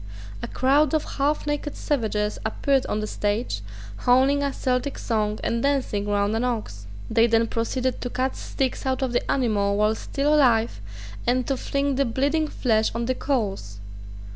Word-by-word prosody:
A - - -4
crowd 280 +3 +2
of 310 - +1 0.2
half 290 +2 +1
naked 295 0 -2
savages 215 -6 -1
appeared 265 +5 +1
on 210 - -1
the - - -2
stage, 210 - -2 0.4
howling 265 - +3
a 280 -1 0
Celtic 255 +1 -1
song 215 -2 -1
and 230 0 0
dancing 260 -7 0
round 205 +1 +1
an 225 - 0
ox. 210 - -3 0.2
They 225 +1 +4
then 230 0 +3
proceeded 250 +3 -2
to 245 - -3
cut 260 +2 -1
steaks 265 0 -3
out 260 +1 0
of 255 -2 -1
the 240 - -1
animal 205 -6 +1
while 210 +1 +3
still 280 +6 -1
alive 235 - +3 0.5
and 250 +1 +2
to 275 - 0
fling 280 +1 -1
the 275 - +3
bleeding 285 +6 +1
flesh 220 -6 +1
on 235 0 -1
the 255 - +1
coals. 200 - -2
245 Hz, 170 wpm, -24 LUFS, 215-275 Hz, 0.5 s, They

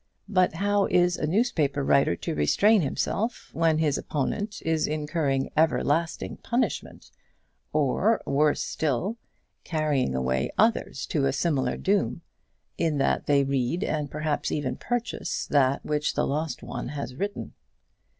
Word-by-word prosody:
But 185 -4 +2
how 200 +2 +2
is 175 0 +3
a 150 - -2
newspaper 160 - +1
writer 135 -9 +3
to - - -4
restrain 200 - +4
himself 210 - -2
when 160 0 +2
his 150 -3 +1
opponent 200 +9 -3
is 160 -1 +1
incurring 150 -3 -1
everlasting 160 +1 +1
punishment, 245 +2 -2 0.6
or, 155 - +2
worse 145 +2 +2
still, 160 - -1 0.5
carrying 150 - 0
away 65 0 0
others 215 - +1
to 140 -3 +1
a - - +2
similar 135 -3 0
doom, 195 -3 0 0.6
in 160 -3 +1
that 135 - +1
they 140 -1 +4
read, 135 +6 0
and 150 -2 -2
perhaps 150 0 -2
even 140 -4 -1
purchase, 245 0 -3
that 140 -2 +2
which 150 0 -1
the - - +1
lost 155 +2 -2
one - - -5
has 140 -3 -5
written? 200 +9 -4
155 Hz, 135 wpm, -26 LUFS, 140-180 Hz, 0.6 s, restrain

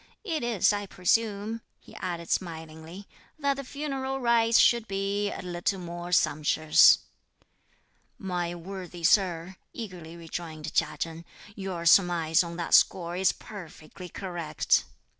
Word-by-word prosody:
"It 330 -7 -2
is, 230 -4 +2
I 205 -1 -3
presume," 210 +4 0 0.2
he - - -17
added 170 -2 -5
smilingly, 165 +2 -5 0.3
"that 280 -2 +1
the 275 0 -6
funeral 270 -1 -4
rites 235 -2 +3
should 235 -2 +4
be 200 +1 -1
a - - -7
little 180 +2 -2
more 175 0 -7
sumptuous." 155 -2 +5 1.2
"My 175 -3 -3
worthy 180 0 -8
sir," 180 0 +2 0.2
eagerly 175 -7 -8
rejoined 160 -2 -7
Chia - - +1
Chen, 165 0 -5 0.3
"your 185 -4 -5
surmise 170 -2 +4
on 170 0 -7
that 170 - -3
score 175 -1 +4
is 190 +1 +3
perfectly 180 -3 -11
correct." 175 -5 -1
180 Hz, 125 wpm, -27 LUFS, 170-205 Hz, 1.2 s, sumptuous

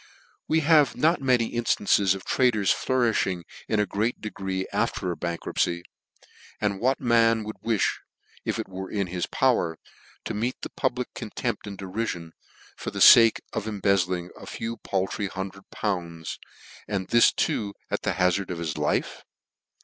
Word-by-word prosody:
We 160 +1 +2
have 150 -3 +4
not 165 +2 +3
many 125 -4 +2
inftances 100 -4 +2
of 95 - -9
traders 115 -7 +2
flourishing 115 -8 +1 0.2
in 110 - +1
a 105 - +3
great 110 +4 -1
degree, 95 -3 -3
after 90 - 0
a - - -3
bankruptcy: 85 0 -2 0.8
and 100 -2 0
what 130 +4 +1
man 115 -2 +3
would 110 0 -7
wi(h, 115 -4 +1 0.4
if - - -2
it - - -4
were 95 0 -7
in 100 -2 -1
his 90 0 -3
power, 100 -11 +1 0.5
to - - -3
meet 115 +4 -2
the - - -5
public - - -2
contempt - - -4
and 100 -1 -7
derifion, 95 -4 -4 0.4
for - - -5
the - - -6
fake 115 -1 +8
of 110 -1 -3
embezzling 95 -4 0
a - - -12
few 115 +1 -4
paltry 95 +2 -2
hundred 95 +1 -7
pounds, 85 -5 -3 0.5
an'd 95 -3 -3
this 120 0 +6
too, 100 -2 -1 0.2
at - - -1
the - - 0
hazard 90 +1 +1
of 90 - -3
his 80 -3 -3
life - - -1
100 Hz, 155 wpm, -26 LUFS, 95-115 Hz, 0.8 s, fake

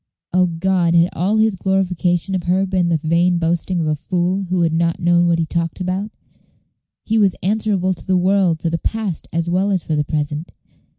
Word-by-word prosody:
O 180 0 +3
God, 175 0 +1
had 170 +1 +4
all 195 +6 0
his 220 -2 +2
glorification 185 -1 0
of 185 -2 -2
her 185 +2 +2
been 185 -2 0
the 165 - +2
vain 170 +3 +1
boasting 170 +2 -1
of - - -1
a 155 0 0
fool 180 +4 -1
who 180 -1 0
had 165 -1 +1
not 165 0 0
known 175 0 +3
what 170 -1 +2
he 165 - 0
talked 165 +1 -3
about? 185 +3 -2 1.0
He 225 0 +1
was 195 -3 +3
answerable 195 -2 +1
to 180 - -13
the 185 -1 +2
world 185 -3 +2
for 165 - 0
the 165 - -1
past 215 -7 -3
as 165 +1 -1
well 185 +3 +1
as 190 -4 0
for 155 - -2
the 150 - +1
present. 150 +2 -3
175 Hz, 210 wpm, -19 LUFS, 170-190 Hz, 1.0 s, had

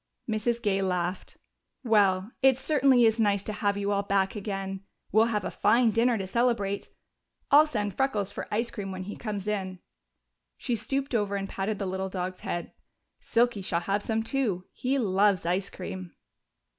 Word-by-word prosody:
Mrs. 230 +2 -1
Gay 195 -2 +1
laughed. 180 -1 -2 0.5
"Well, 205 -3 +3
it 265 -1 +5
certainly 265 -4 +4
is 225 +1 +3
nice 200 -2 +2
to 215 - -4
have 205 -1 0
you 200 0 -1
all 200 0 +2
back 200 0 0
again. 195 -2 -4 0.3
We'll 220 +2 +5
have 215 -3 -1
a - - -3
fine 230 +2 +3
dinner 230 +2 +2
to 195 - -3
celebrate 205 -2 0 0.6
I'll 300 +2 +8
send 205 -8 -2
Freckles 220 -8 0
for - - -6
ice 230 +3 0
cream 195 -2 -5
when 185 0 -5
he 205 +3 -6
comes 210 -3 -5
in." 190 -3 -2 0.8
She 245 - -1
stooped 270 +5 -2
over 205 -3 0
and 195 0 -2
patted 200 +2 -3
the 195 - -3
little 190 +1 -3
dog's 185 0 -4
head. 175 - -4 0.5
"Silky 235 -3 +1
shall 175 -2 -1
have 200 +3 0
some 225 +1 -1
too. 225 -8 -1
He 265 +2 -1
loves 200 -5 +2
ice 185 +3 0
cream." 185 -1 -7
205 Hz, 175 wpm, -28 LUFS, 195-230 Hz, 0.8 s, I'll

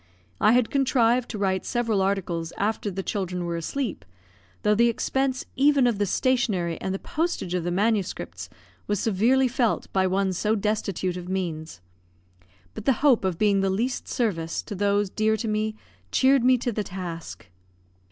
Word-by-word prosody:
I 215 - +5
had 245 -2 +2
contrived 250 -3 +2
to 220 - -4
write 190 -2 0
several 230 -5 0
articles 180 -4 -1
after 210 +1 -1
the 195 0 -4
children 180 -3 -3
were 170 0 -2
asleep, 195 - -3 0.6
though 210 - +4
the 235 +3 +4
expense 260 +2 -1
even 275 -1 +4
of 235 -4 +1
the 205 - +1
stationery 195 - 0
and 190 - -2
the 195 - -1
postage 325 - -2
of 180 -2 -1
the 175 - -1
manuscripts 205 +1 -1 0.4
was 205 -2 0
severely 235 +6 +3
felt 240 -2 -1
by 190 -1 +3
one 190 0 +1
so 210 +5 +1
destitute 200 -3 -1
of 180 0 -7
means; 160 - -4 0.9
but - - -8
the 270 - +5
hope 255 -7 +5
of 185 -3 -1
being 205 0 +3
of - - +2
the 195 - +1
least 235 +7 -1
service 165 -9 -1
to 215 - -7
those 200 0 +1
dear 220 0 +1
to 225 - -3
me 215 0 -1 0.4
cheered 265 -1 +4
me 255 0 +5
to 240 0 -2
the 210 -1 -2
task. 175 - -7
205 Hz, 175 wpm, -25 LUFS, 185-240 Hz, 0.9 s, I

